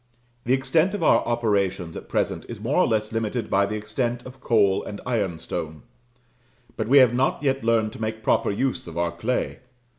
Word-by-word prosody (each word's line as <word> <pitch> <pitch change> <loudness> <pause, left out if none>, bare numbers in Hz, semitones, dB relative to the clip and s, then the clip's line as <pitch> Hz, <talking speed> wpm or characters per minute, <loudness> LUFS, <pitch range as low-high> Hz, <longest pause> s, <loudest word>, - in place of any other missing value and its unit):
The 125 - +2
extent 155 +9 +2
of 200 - -3
our - - +4
operations 100 -7 0
at - - -9
present - - -1
is 115 - -7
more 120 +7 -1
or 180 - +4
less 110 -2 0
limited 115 +1 -2
by 100 +1 +3
the 105 - -3
extent 120 +3 -3
of 130 +1 -11
coal 100 -5 +3
and 105 - -7
ironstone, 85 -8 -3 0.9
but - - -3
we 140 +4 +5
have 130 -3 +7
not 130 +3 0
yet 135 -2 0
learned 115 -1 +2
to - - -10
make 110 0 -3
proper - - +2
use 130 +3 -1
of 85 0 -8
our 85 0 0
clay. 110 +9 -2
115 Hz, 190 wpm, -24 LUFS, 100-125 Hz, 0.9 s, have